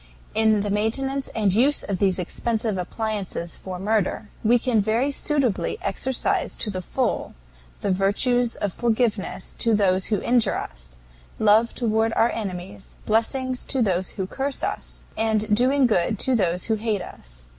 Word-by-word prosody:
"In 220 -1 +3
the 205 0 -2
maintenance 265 +6 -1
and 205 -4 +2
use 265 +8 +3
of 195 -3 -3
these 190 -2 +2
expensive 220 +4 -1
appliances 195 -3 -3
for 185 -1 -7
murder, 210 +1 0
we 235 +2 +5
can 240 -3 +2
very 230 +7 +1
suitably 280 - 0
exercise 265 -1 -1
to 210 - -3
the 185 -1 -4
full - - -2 0.5
the 200 - 0
virtues 230 +6 +2
of 200 -3 -2
forgiveness 225 -5 -1
to 230 -2 +3
those 190 -2 +2
who 210 -3 +1
injure 235 -4 +2
us, - - -8 0.4
love 220 +2 +4
toward 225 -1 +1
our 230 - +3
enemies, 195 -1 -6
blessings 255 +4 0
to 265 -3 0
those 185 -3 0
who 190 - -1
curse 270 +8 -3
us, - - -4
and 215 -1 +1
doing 260 +4 +3
good 215 -2 +2
to 260 +5 +1
those 180 -4 +1
who 225 - 0
hate 210 -3 -1
us. - - -12
220 Hz, 155 wpm, -24 LUFS, 195-240 Hz, 0.5 s, we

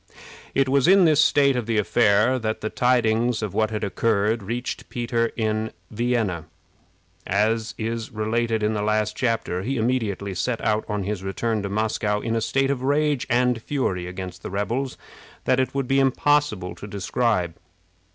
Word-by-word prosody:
It 135 0 +3
was 140 +1 +3
in 190 0 +6
this 155 -1 +5
state 140 -2 +4
of 120 -3 -2
the 115 -1 0
affair 110 +3 +3
that 110 -1 -3
the 110 - -3
tidings 120 -1 +2
of 105 - -3
what 110 -1 +1
had 110 -1 -3
occurred 110 +2 +1
reached 120 +5 -4
Peter 120 -1 0
in 110 -1 -1 0.2
Vienna, 110 -7 -1 0.8
as 110 +3 0
is 115 0 -3
related 110 +1 -1
in 105 +1 +1
the 105 - -1
last 105 0 0
chapter. 115 -7 -1
He 135 +7 -2
immediately 110 -5 -1
set 115 +6 -1
out 105 0 +1
on 105 -1 -1
his 100 0 -3
return 105 +3 -2
to 100 - -4
Moscow 105 0 0
in 115 +1 -2
a 115 - 0
state 135 +4 +1
of 135 -3 -2
rage 145 0 +1
and 125 -1 +2
fury 95 -11 -2
against 90 -1 -7
the - - -6
rebels 115 +7 -2 0.5
that 130 - +3
it 130 +1 -1
would 135 -2 -1
be 135 +1 +3
impossible 135 -7 +1
to 105 - -10
describe. 100 -2 0
115 Hz, 170 wpm, -24 LUFS, 105-125 Hz, 0.8 s, in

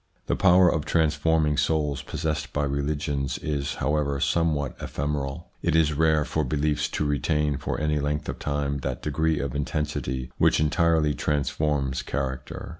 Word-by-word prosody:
The - - 0
power 90 -1 +6
of 80 -3 +1
transforming 80 -1 +2
souls 75 -3 +1
possessed 75 -4 -3
by 75 - 0
religions 70 0 -1
is, 75 -1 -2
however, 70 -1 0
somewhat 75 -6 +1
ephemeral. 70 +2 -3
It 85 -2 +1
is 80 -2 +3
rare 80 0 +3
for 80 - -1
beliefs 75 +2 0
to 75 - 0
retain 75 0 +1
for 70 - -3
any 75 -1 +1
length 75 +1 -2
of - - -4
time 70 -1 -1
that - - -4
degree 80 +1 +1
of 70 -2 -3
intensity 70 -4 -2
which - - +4
entirely 80 -1 +2
transforms 70 -2 0
char 65 -2 -2
acter. - - -9
75 Hz, 155 wpm, -26 LUFS, 70-75 Hz, -, power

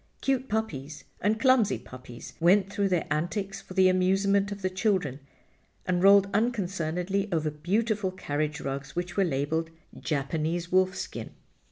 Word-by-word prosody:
Cute 265 -1 0
puppies 155 -10 -3 0.2
and 215 +2 +1
clumsy 250 -4 +4
puppies 125 -2 -11
went 190 +4 +4
through 200 -1 +1
their 180 -3 +1
antics 195 +5 -2
for 185 - -12
the 190 -1 +6
amusement 195 +2 +2
of 200 -1 -7
the 185 - +1
children 185 - 0 0.7
and 180 -1 0
rolled 200 +1 +7
unconcernedly 195 -3 -1
over 155 -2 0
beautiful 200 +6 0
carriage 150 -5 -3
rugs 135 0 -5
which 175 0 -3
were 195 - +3
labeled 160 +1 -1 0.3
"Japanese 160 +4 -2
Wolfskin." 185 +1 0
185 Hz, 140 wpm, -28 LUFS, 155-200 Hz, 0.7 s, rolled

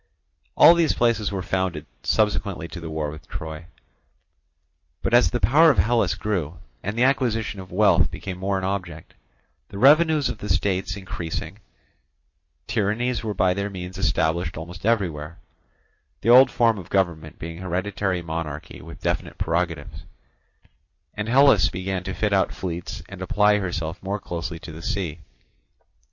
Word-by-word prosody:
All 170 - +9
these 170 -2 +2
places 115 -4 +1
were 95 -2 -3
founded 95 -6 -2 0.2
subsequently 100 - 0
to 90 - -7
the 80 -1 -7
war 80 -1 -3
with 75 0 -12
Troy. 80 -2 -7 1.4
But - - -1
as 120 -8 +6
the - - -2
power 145 - +5
of 140 - +3
Hellas 115 -5 +2
grew, 90 -6 -3 0.2
and 105 +4 -4
the 120 - +3
acquisition 120 -6 +1
of 95 -1 -10
wealth 105 +3 +4
became 95 -2 -7
more 95 +1 0
an 95 - -4
object, 95 -5 -4 0.6
the - - -8
revenues 150 +4 +5
of - - -5
the 105 - -6
states 95 +1 0
increasing, 85 -4 -5 1.1
tyrannies 115 +4 -1
were 105 -2 -3
by 90 0 +3
their 100 +2 -3
means 95 -1 -7
established 85 -2 0
almost 90 +5 -6
everywhere—the 85 +1 -4
old 130 +2 +8
form 115 -3 +2
of 90 -1 -11
government 85 -5 -1
being 85 +1 -7
hereditary 95 0 -2
monarchy 80 -2 -5
with - - -12
definite - - -2
prerogatives—and 80 +5 -6
Hellas 130 -5 +5
began 95 0 -3
to 95 - -4
fit 105 -1 0
out 95 -1 +2
fleets 85 -2 -5
and - - -10
apply 105 +1 +3
herself 85 -3 -4
more 100 +2 -3
closely 85 -2 -5
to 80 0 -10
the 80 +1 -9
sea. 90 -5 -3
95 Hz, 150 wpm, -24 LUFS, 85-105 Hz, 1.4 s, All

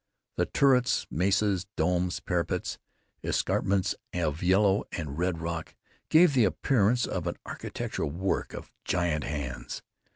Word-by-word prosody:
The - - +2
turrets, 125 -3 +3
mesas, 95 +1 +1
domes, 90 0 +1
parapets 85 -1 -2 0.4
and - - -4
escarpments 95 -1 +1 0.2
of 80 -3 -1
yellow 95 +2 +4
and 75 -4 -4
red 90 +1 0
rock 85 -1 -4 0.3
gave 165 -1 +6
the 125 -3 +5
appearance 120 +2 +2
of 90 -2 -3
an 85 - -2
architectural - - -4
work 90 +6 -2
of - - -9
giant 85 -5 0
hands. 65 -5 -5
90 Hz, 130 wpm, -28 LUFS, 85-100 Hz, 0.4 s, gave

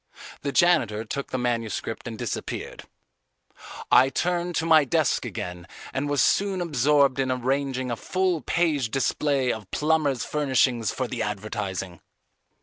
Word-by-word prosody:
The 140 - -2
janitor 120 -11 +3
took 140 +5 -4
the - - -2
manuscript 115 -2 -2
and 115 -1 -6
disappeared. - - -5 1.1
I 130 +1 +6
turned 175 +4 -1
to 160 - 0
my 160 -2 +6
desk 130 - +1
again 90 0 -6 0.3
and 135 +2 -2
was 145 -2 +2
soon 195 -1 +2
absorbed 140 -4 +2
in 130 -1 +1
arranging 130 0 -1
a - - 0
full 185 +4 -1
page 155 -8 0
display 135 +1 +1
of 105 -4 -9
plumbers' 150 -5 +1
furnishings 130 -5 +1
for 130 - -3
the 120 -1 -4
advertising. 100 -4 -4
130 Hz, 140 wpm, -25 LUFS, 115-150 Hz, 1.1 s, I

